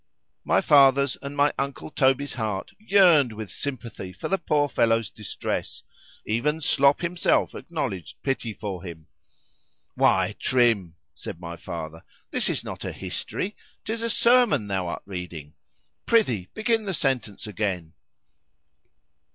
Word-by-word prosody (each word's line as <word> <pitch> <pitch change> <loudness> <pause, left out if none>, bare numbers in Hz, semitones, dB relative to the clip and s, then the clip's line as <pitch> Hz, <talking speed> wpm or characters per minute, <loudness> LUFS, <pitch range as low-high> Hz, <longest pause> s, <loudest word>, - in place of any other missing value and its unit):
_ - - -53 0.4
My - - +3
father's 140 -2 +5
and 140 +1 -7
my 145 +1 +4
uncle 140 +2 -4
Toby's 135 0 +2
heart 105 -5 -3
yearned 180 - +5
with 110 -2 -7
sympathy 115 -8 -5
for 90 - -6
the 195 - +1
poor 145 -2 +2
fellow's 115 -4 +1
distress; 105 - -4 0.4
even 145 +9 0
Slop 140 -2 +3
himself 170 0 +1
acknowledged 125 - -5
pity 135 -4 -1
for 100 -4 -5
him.——Why, 85 -4 -3
Trim, 115 -9 +2 0.2
said - - -8
my 85 -1 -7
father, 80 -1 -7 0.3
this - - +1
is - - -1
not - - -7
a - - -3
history,——'tis 215 +3 -5
a 230 - -1
sermon 235 - +4
thou 95 -3 -2
art 85 - -5
reading; 90 -6 -7 0.5
prithee 125 - +2
begin 220 0 +1
the 190 -2 -1
sentence 125 -9 -1
again. 95 -6 -3
125 Hz, 130 wpm, -25 LUFS, 95-150 Hz, 0.5 s, father's